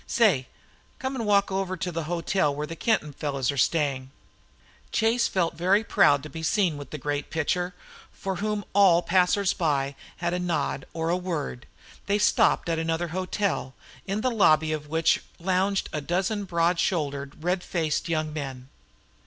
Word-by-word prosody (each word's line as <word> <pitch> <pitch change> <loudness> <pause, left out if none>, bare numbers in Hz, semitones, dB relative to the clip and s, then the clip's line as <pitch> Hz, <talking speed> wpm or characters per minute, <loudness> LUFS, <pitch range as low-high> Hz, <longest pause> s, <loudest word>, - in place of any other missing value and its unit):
Say, 185 - +3 0.5
come 265 +1 -3
and 230 -4 -3
walk 200 -1 +3
over 190 -1 -1
to 180 +2 -3
the 165 -1 -3
hotel 170 -2 0
where 150 +1 -3
the 165 - -7
Kenton 165 -6 0
fellows 140 -2 -1
are - - -6
staying." 135 -2 +1 0.8
Chase 230 +1 +2
felt 175 -3 0
very 185 +6 +2
proud 145 -9 +4
to - - -6
be 160 - -7
seen 175 0 +1
with 145 -1 -8
the 155 - -5
great 145 +1 -3
pitcher, 180 +3 -1 0.4
for 190 -1 -4
whom 210 +1 -2
all 185 -4 +5
passers 185 +2 +3
by 140 -5 0 0.2
had 175 0 -1
a 180 - 0
nod 170 -6 -2
or 165 0 -2
a 175 - +2
word. 165 -8 -4 0.4
They 200 +1 +2
stopped 210 - +3
at 165 -1 0
another 165 +1 -1
hotel, 185 -5 -2 0.3
in 200 +2 -1
the 255 - +1
lobby 155 -8 +4
of 150 -1 -3
which 160 +1 +2 0.2
lounged 190 +2 +1
a 150 - -2
dozen 190 +6 -1
broad 170 -1 +1
shouldered, 145 -4 -2
red 180 +1 +1
faced 165 -2 -1
young 155 -2 -1
men. 135 -4 -6
170 Hz, 170 wpm, -26 LUFS, 150-190 Hz, 0.8 s, all